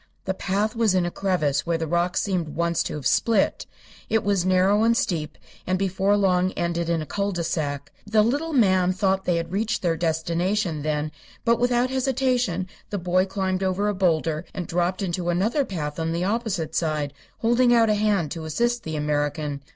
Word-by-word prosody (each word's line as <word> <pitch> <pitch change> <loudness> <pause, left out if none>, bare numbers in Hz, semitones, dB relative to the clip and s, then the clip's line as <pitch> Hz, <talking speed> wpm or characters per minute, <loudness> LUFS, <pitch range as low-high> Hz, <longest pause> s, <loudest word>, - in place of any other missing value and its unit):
The 190 - 0
path 200 +3 -1
was 225 -4 +2
in 180 -2 +2
a 175 - -2
crevasse 175 -8 0
where 170 -1 +1
the 165 - -2
rocks 175 +3 0
seemed 180 -6 -2
once 170 0 +1
to - - -3
have 145 -4 -7
split. 205 - +2 0.4
It 225 0 +2
was 200 -3 +1
narrow 185 +3 +3
and 230 +1 +3
steep, 155 -7 -2 0.3
and 185 +1 +1
before 195 +1 +1
long 185 -2 +2
ended 170 -1 -2
in 165 -2 0
a - - -7
cul 200 +5 -2
de 175 -3 -2
sac. 145 -4 -3 0.2
The 215 0 +4
little 285 +8 0
man 190 - +3
thought 190 0 0
they 175 - +2
had 170 0 -3
reached 210 +2 -1
their 170 -2 +2
destination, 170 +2 -1
then; 150 0 -1 0.3
but 235 -1 +3
without 245 +1 +2
hesitation 255 -8 0 0.2
the 205 - -2
boy 185 +1 +1
climbed 190 -1 -1
over 190 +2 0
a - - 0
boulder 165 -4 +1
and 180 - -3
dropped 175 +3 -1
into 175 -1 -2
another 210 - +1
path 155 - -4
on 165 0 -1
the 170 +1 -1
opposite 205 -5 -1
side, 150 -3 -1 0.2
holding 240 +2 +3
out 230 -2 +5
a - - +4
hand 205 -7 +1
to 160 -2 -5
assist 235 +10 0
the 160 -5 -5
American. 145 -1 -1
185 Hz, 195 wpm, -24 LUFS, 165-210 Hz, 0.4 s, out